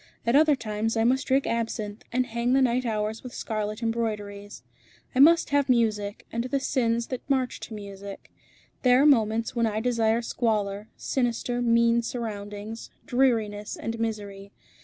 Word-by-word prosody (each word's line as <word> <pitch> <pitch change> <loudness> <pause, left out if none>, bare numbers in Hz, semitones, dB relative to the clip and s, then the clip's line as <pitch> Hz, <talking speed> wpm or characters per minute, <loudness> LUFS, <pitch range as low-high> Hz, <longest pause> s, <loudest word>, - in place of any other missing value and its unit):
At 235 +2 +2
other 305 0 +6
times 225 -1 -2
I 225 - +3
must 255 +3 +2
drink 270 +1 +2
absinthe, 225 -2 -3
and 255 +1 +1
hang 235 +1 -1
the 270 - +4
night 250 0 +1
hours 215 0 -2
with 250 - -9
scarlet 215 0 -3
embroideries. 210 -3 -3 0.5
I 255 - -1
must 325 +2 +6
have 285 -1 +2
music, 215 -4 +1
and 235 +1 -2
the 275 +2 0
sins 235 -3 0
that 255 - -4
march 260 -2 0
to 220 - -8
music. 200 -1 -9 0.5
There 250 +1 +5
are - - +4
moments 230 -4 +3
when 235 -1 +2
I 215 0 -1
desire 230 -1 +1
squalor, 210 -3 -1
sinister, 245 -1 -1
mean 235 0 +3
surroundings, 215 -2 -6 0.2
dreariness, 225 -5 +1
and 225 0 -4
misery. 200 -3 -4
230 Hz, 160 wpm, -26 LUFS, 210-245 Hz, 0.5 s, other